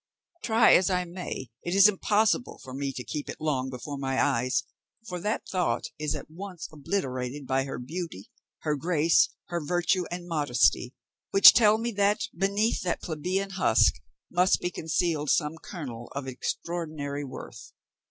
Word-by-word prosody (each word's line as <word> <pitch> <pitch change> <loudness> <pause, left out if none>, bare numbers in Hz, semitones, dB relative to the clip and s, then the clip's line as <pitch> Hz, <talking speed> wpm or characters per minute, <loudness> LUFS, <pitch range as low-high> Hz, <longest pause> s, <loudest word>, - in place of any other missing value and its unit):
Try 225 0 +5
as 185 - +5
I 180 -1 0
may, 170 - -6
it 175 +2 -3
is 195 +1 +8
impossible 210 +3 +1
for 130 -1 -9
me 140 +1 -3
to 125 -1 -6
keep 145 +6 -5
it - - -6
long 135 -4 -1
before 135 +3 -6
my 135 -1 -1
eyes; 125 +2 +1 0.4
for 180 -1 -4
that 210 +5 -2
thought 175 -11 0 0.2
is 150 -2 -1
at - - -6
once 180 +1 -8
obliterated 140 -4 -3
by 135 +1 0
her 135 - -5
beauty, 150 - -6 0.3
her 150 -1 0
grace, 165 +1 +3 0.2
her 170 -2 -2
virtue, 175 +3 +1
and 175 0 -6
modesty, 130 -6 +1 0.3
which 195 - +9
tell 215 -2 +5
me 235 +1 -2
that, 205 0 +1
beneath 200 +5 +1
that 175 -2 -2
plebeian 180 +5 -2
husk, 185 - +3 0.3
must 180 +2 +3
be 175 - -2
concealed 160 -2 -1
some 155 +2 +1
kernel 125 - -7
of 140 -1 -4
extraordinary 145 +1 -4
worth. 135 - -9
165 Hz, 160 wpm, -27 LUFS, 135-185 Hz, 0.4 s, which